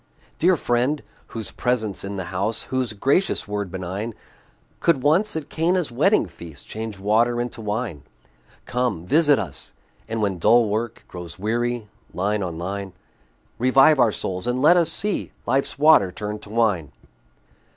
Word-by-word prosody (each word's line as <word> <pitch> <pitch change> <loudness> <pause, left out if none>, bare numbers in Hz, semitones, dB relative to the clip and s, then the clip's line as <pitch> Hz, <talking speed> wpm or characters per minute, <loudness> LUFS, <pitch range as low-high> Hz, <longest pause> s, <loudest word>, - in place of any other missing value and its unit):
Dear 180 +1 +4
Friend! 125 +4 0 0.2
whose 115 -2 -2
presence 110 -5 -1
in 100 +1 -5
the 95 - -3
house, 100 +5 +1
Whose 130 -3 0
gracious 135 - +1
word 100 -2 -3
benign, 95 +4 -5 0.6
Could 150 -7 +2
once, 175 +8 +3
at 155 -2 -4
Cana's 170 -2 0
wedding 155 - +3
feast, 85 -5 -11
Change 110 -1 -6
water 115 +4 +2
into 120 -1 -4
wine; 105 - -3 0.6
Come, 125 -9 -1
visit 145 - +4
us! 95 -10 -5 0.3
and 115 0 -3
when 100 -4 -1
dull 115 +6 +5
work 110 +2 -3
Grows 90 -2 -8
weary, 120 +2 -1 0.3
line 100 +3 0
on 85 -4 -4
line, 95 +2 -5 0.7
Revive 135 +4 +5
our 120 -3 +5
souls, 95 0 -3
and 125 +1 0
let 155 +6 +6
us 170 -2 +4
see 210 -1 -1
Life's 135 +1 0
water 145 -11 +5
turned 105 +2 -5
to 105 - -11
wine. 105 -9 +1
115 Hz, 150 wpm, -23 LUFS, 100-135 Hz, 0.7 s, let